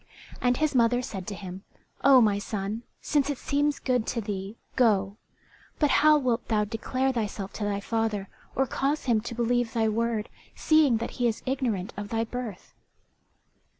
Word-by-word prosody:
And 245 0 +2
his 310 -1 +1
mother 245 0 +3
said 195 -7 -6
to 205 - -4
him, 190 0 -8 0.4
"O 270 -2 +8
my 205 -3 +3
son, 205 +2 -3 0.2
since 290 -1 +1
it 285 - -1
seems 285 +1 0
good 250 -4 0
to 235 - -1
thee, 200 -1 -4 0.2
go; 205 -5 +2 0.6
but 295 -2 +2
how 305 0 +7
wilt 250 -4 0
thou 210 -2 +2
declare 255 +5 -1
thyself 210 -5 -3
to 215 - -4
thy 205 -1 -1
father, 215 -2 -1 0.3
or 270 - +2
cause 275 +4 -1
him 230 -4 +2
to 235 +1 -6
believe 240 0 +1
thy 225 -1 +2
word, 225 0 -1 0.3
seeing 310 -7 +4
that 230 - -4
he 240 - +4
is 225 - -2
ignorant 245 -8 -1
of 205 0 -5
thy 225 0 0
birth?" 230 -4 -6
230 Hz, 175 wpm, -27 LUFS, 210-255 Hz, 0.6 s, O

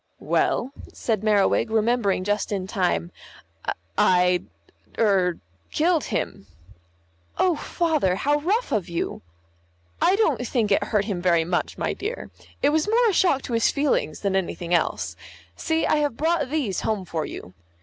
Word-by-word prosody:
"Well," 260 - 0 0.2
said 220 -4 -2
Merriwig, 210 0 +2
remembering 220 -3 +1
just 205 +2 -1
in 195 -2 -2
time, 180 -3 -1 0.9
"I 180 -1 +4 0.6
er 190 -5 +2 0.3
killed 325 0 +1
him." 100 - -3 0.9
"Oh, 360 -3 +3
Father, 310 - 0
how 290 +8 +1
rough 410 +11 0
of 205 -6 -1
you." 170 - -3 0.8
"I 370 - +4
don't 405 - +1
think 220 -5 0
it 200 +1 +3
hurt 210 -2 0
him 195 -5 -3
very 170 -2 +3
much, 175 +1 -2
my - - -1
dear. 430 +5 -5 0.3
It 285 - +5
was 310 +5 +1
more 465 +1 +4
a - - -5
shock 335 -7 +2
to 245 - -5
his 230 0 +3
feelings 280 - 0
than 195 -2 0
anything 175 -2 -2
else. 175 - 0 0.4
See, 320 -1 0
I - - +2
have 290 -5 0
brought 320 -3 +1
these 265 - -1
home 210 -4 -1
for 160 -3 -3
you." 90 - -9
220 Hz, 155 wpm, -24 LUFS, 185-300 Hz, 0.9 s, It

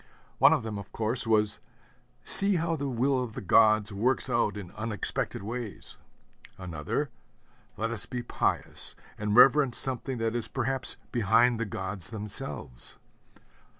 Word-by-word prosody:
One - - +7
of - - +1
them, 110 -2 -5
of 100 - -11
course, 115 +2 -1
was, 105 -2 +2 0.6
'See 200 0 +7
how 165 0 -1
the 140 -2 -4
will 130 +2 0
of 115 -3 -7
the - - -6
gods 110 +1 +3
works 125 +5 0
out 115 -3 0
in 90 -4 -9
unexpected 110 -2 -2
ways.' 115 0 -7 0.6
Another, 90 - -4 0.7
'Let 115 +1 -2
us 115 -3 +3
be 125 -1 -5
pious, - - -2 0.2
and 105 0 -2
reverence 135 +1 +5
something 130 0 +2
that 115 -1 -2
is 120 -2 -2
perhaps 130 0 -2
behind 120 +1 +2
the 115 - -1
gods 95 -1 -3
themselves.' 105 - -2
115 Hz, 145 wpm, -28 LUFS, 105-125 Hz, 0.7 s, One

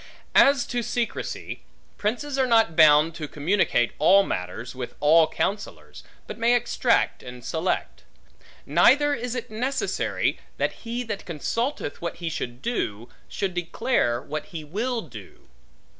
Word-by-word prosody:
As 275 -3 +5
to 245 - -2
secrecy; 235 0 -4 0.4
princes 250 +7 -2
are 260 - +3
not 225 -8 +3
bound 155 0 +6
to 155 -2 -6
communicate 150 - +1
all 195 +6 +6
matters, 90 - -5
with 125 -2 -7
all 155 +2 +5
counsellors; 200 +6 -4 0.2
but - - -8
may 235 +1 +4
extract 240 0 +1
and 125 -1 -10
select. 165 +3 -2 0.6
Neither 290 +1 +4
is 245 -2 -3
it 240 -3 -5
necessary, 260 - -1 0.2
that - - 0 0.2
he 240 +2 -2
that 210 -4 -5
consulteth 230 - -3
what 170 - -3
he 170 -1 -4
should 120 -3 -5
do, 120 - -3 0.2
should 195 -3 -2
declare 175 - 0
what 150 +3 -5
he 165 -6 -7
will 225 +10 -2
do. 110 - -13
190 Hz, 140 wpm, -25 LUFS, 150-240 Hz, 0.6 s, bound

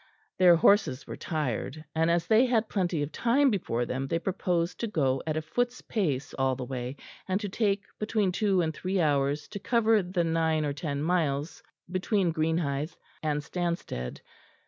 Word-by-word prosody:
Their 180 -2 +8
horses 165 -6 +3
were - - -6
tired; 155 0 -3
and 160 +1 +2
as 170 0 +2
they 220 +7 +5
had 230 -3 +1
plenty 175 -6 0
of 145 - -5
time 260 - +3
before 120 - -1
them 130 +3 -3
they 165 - 0
proposed 175 -1 -1
to 230 - -1
go 135 -10 +1
at 155 0 0
a 155 - -2
foot's 245 +10 -1
pace 145 - -2
all 135 -1 +2
the 125 0 -5
way, 125 0 -4 0.3
and 190 +1 +1
to 210 - -3
take 200 -1 0 0.2
between 215 -3 +1
two 195 -1 +2
and 160 -2 -1
three 185 +4 -2
hours 145 -2 +1
to 200 - -6
cover 225 -1 +3
the 180 -1 -1
nine 160 -2 +1
or 145 - -1
ten 145 -1 -3
miles 155 -3 0 0.3
between 185 0 0
Greenhithe 155 -2 -1 0.3
and 150 -1 -1
Stanstead. 170 - -3
165 Hz, 175 wpm, -28 LUFS, 145-195 Hz, 0.3 s, Their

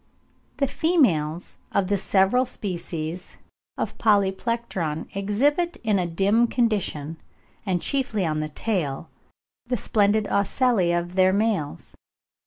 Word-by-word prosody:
The 280 - +2
females 190 - +1
of 200 - +1
the 200 +2 +1
several 195 +5 +2
species 175 -6 -5 0.4
of - - -4
Polyplectron 200 -5 0
exhibit 280 - +1
in 210 -3 +2
a 180 - 0
dim 200 +7 +2
condition, 195 - -1 0.5
and 180 -2 0
chiefly 245 -8 0
on 155 -1 -1
the 155 0 -3
tail, 155 -5 -3 0.6
the 245 0 0
splendid 210 0 +2
ocelli 200 -2 +2
of 175 +1 -1
their 185 0 +4
males. 200 -7 -1
195 Hz, 115 wpm, -24 LUFS, 175-230 Hz, 0.6 s, their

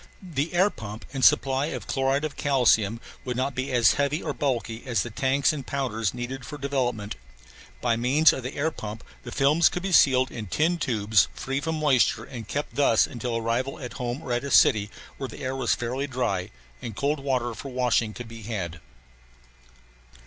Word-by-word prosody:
The 165 -2 -3
air 190 +4 +4
pump 110 0 -8
and 135 -2 -3
supply 135 +1 +4
of - - -5
chloride 135 +2 0
of 155 - -5
calcium 115 -6 +2 0.2
would 125 -1 -3
not 130 +2 0
be 130 +2 -3
as 120 -2 +5
heavy 140 +3 0
or - - -2
bulky 120 -5 -2
as 115 -5 +1
the 120 - -7
tanks 135 +5 +2
and 145 -3 -5
powders 120 -6 -1
needed 125 +2 -5
for 150 +3 -7
development. 125 - -2 0.6
By 115 - +2
means 135 +7 +4
of - - -4
the 130 +2 -6
air 155 +3 0
pump 110 -4 -7 0.2
the 120 - -9
films 145 +6 +4
could 180 - -5
be 195 - -2
sealed 130 -6 +5
in 110 -3 -6
tin 165 - +1
tubes 110 - +2
free 135 +1 -2
from 160 +1 -2
moisture 145 -5 +3
and 115 -5 -8
kept 145 +6 -4
thus 135 -6 +4
until 120 -1 -3
arrival 115 +4 -1
at 125 -3 -7
home 125 +5 -3
or 125 - -2
at 120 - -1
a 140 - -4
city 105 -5 +5 0.3
where 135 - -5
the - - -9
air 130 +1 -2
was 130 -3 +1
fairly 130 +4 -3
dry 120 -9 -1 0.3
and 115 -4 -6
cold 145 +5 0
water 130 -4 -1
for 135 - -8
washing 125 -3 +1
could 120 - -7
be 115 0 -10
had. 95 -7 -5
130 Hz, 195 wpm, -26 LUFS, 115-140 Hz, 0.6 s, as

